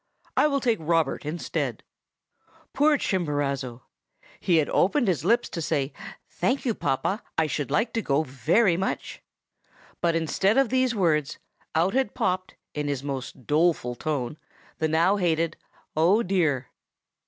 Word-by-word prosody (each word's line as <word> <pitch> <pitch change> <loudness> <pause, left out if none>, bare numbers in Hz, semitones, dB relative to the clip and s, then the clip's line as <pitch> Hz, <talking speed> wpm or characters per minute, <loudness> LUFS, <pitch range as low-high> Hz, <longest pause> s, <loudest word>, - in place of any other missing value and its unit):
I - - +4
will 280 -2 0
take 235 -3 +1
Robert 160 -3 0
instead.' 165 +3 -3 0.9
"Poor 295 +2 +4
Chimborazo! 140 - -2 0.6
He 175 -3 +2
had 155 - +2
opened 240 +6 +2
his 175 -5 +1
lips 235 +7 +3
to 165 - -4
say, 150 -3 -1 0.3
'Thank 275 +2 -1
you, 235 - +2
papa. 195 - -1 0.2
I 160 - +3
should 145 -2 -2
like 225 +4 +1
to 225 - 0
go 145 -4 +1
very 160 - +2
much!' 190 - -3 0.8
and, 170 -1 +2
instead 190 - +1
of 270 -3 +4
these 255 -1 +2
words, 155 -7 +1 0.4
out 175 +5 +2
had 260 -5 0
popped, 185 0 -1 0.2
in 150 -1 -2
his 140 -2 -2
most 135 -3 -5
doleful 150 -4 +2
tone, 145 +1 -3 0.4
the 160 - +2
now 170 +6 +3
hated 165 -3 +1 0.4
'Oh, 180 +9 +4
dear! 160 -9 0
165 Hz, 145 wpm, -26 LUFS, 145-200 Hz, 0.9 s, I